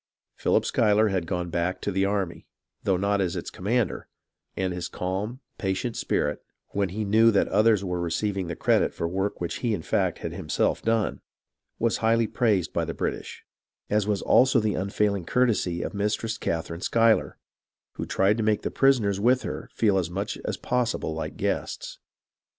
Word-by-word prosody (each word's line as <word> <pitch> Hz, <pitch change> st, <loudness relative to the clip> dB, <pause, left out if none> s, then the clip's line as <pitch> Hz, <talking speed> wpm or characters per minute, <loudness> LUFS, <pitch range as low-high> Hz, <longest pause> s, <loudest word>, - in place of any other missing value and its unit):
Philip -, -, +1 dB
Schuyler 105 Hz, 0 st, +3 dB
had 95 Hz, -4 st, -1 dB
gone 90 Hz, -1 st, -2 dB
back 90 Hz, +2 st, -1 dB
to 100 Hz, -, -1 dB
the 95 Hz, +1 st, +1 dB
army, 100 Hz, -3 st, -2 dB, 0.3 s
though 95 Hz, -2 st, +1 dB
not 100 Hz, +1 st, +1 dB
as 90 Hz, -3 st, -1 dB
its -, -, -5 dB
commander; 110 Hz, +2 st, -1 dB, 0.5 s
and 95 Hz, -1 st, -1 dB
his 90 Hz, -1 st, -4 dB
calm, 100 Hz, +8 st, -4 dB, 0.2 s
patient 105 Hz, +3 st, -2 dB
spirit, 75 Hz, 0 st, -1 dB, 0.3 s
when 100 Hz, -1 st, -1 dB
he 105 Hz, +4 st, -3 dB
knew 110 Hz, +3 st, +5 dB
that 100 Hz, -3 st, +3 dB
others 105 Hz, 0 st, +4 dB
were 90 Hz, -2 st, -2 dB
receiving 95 Hz, +2 st, -1 dB
the 85 Hz, -, -4 dB
credit -, -, +2 dB
for 85 Hz, -, -1 dB
work 95 Hz, +4 st, -2 dB
which 85 Hz, +7 st, -4 dB
in 105 Hz, -9 st, 0 dB
fact -, -, 0 dB
he -, -, -18 dB
had -, -, -3 dB
himself -, -, 0 dB
done, 110 Hz, -11 st, 0 dB, 0.6 s
was 115 Hz, -1 st, +1 dB
highly 115 Hz, +1 st, +3 dB
praised 105 Hz, -5 st, +1 dB
by -, -, 0 dB
the -, -, -4 dB
British, -, -, -4 dB, 0.5 s
as 105 Hz, -1 st, +2 dB
was 105 Hz, -2 st, 0 dB
also 125 Hz, +2 st, +5 dB
the 105 Hz, -2 st, 0 dB
unfailing 100 Hz, 0 st, 0 dB
courtesy 105 Hz, -6 st, +1 dB
of -, -, -4 dB
Mistress 105 Hz, +2 st, -1 dB
Catherine 85 Hz, +1 st, -3 dB
Schuyler, 115 Hz, +1 st, +2 dB, 0.5 s
who -, -, -6 dB
tried 100 Hz, +3 st, +2 dB
to 115 Hz, -, 0 dB
make 105 Hz, -1 st, +1 dB
the -, -, -2 dB
prisoners 115 Hz, -8 st, +3 dB
with 125 Hz, +4 st, +3 dB
her -, -, -5 dB
feel 100 Hz, -4 st, +2 dB
as 85 Hz, -2 st, -2 dB
much 100 Hz, +4 st, -3 dB
as -, -, -2 dB
possible 125 Hz, -9 st, -1 dB
like 80 Hz, -, -5 dB
guests. -, -, -3 dB
100 Hz, 180 wpm, -26 LUFS, 90-110 Hz, 0.6 s, knew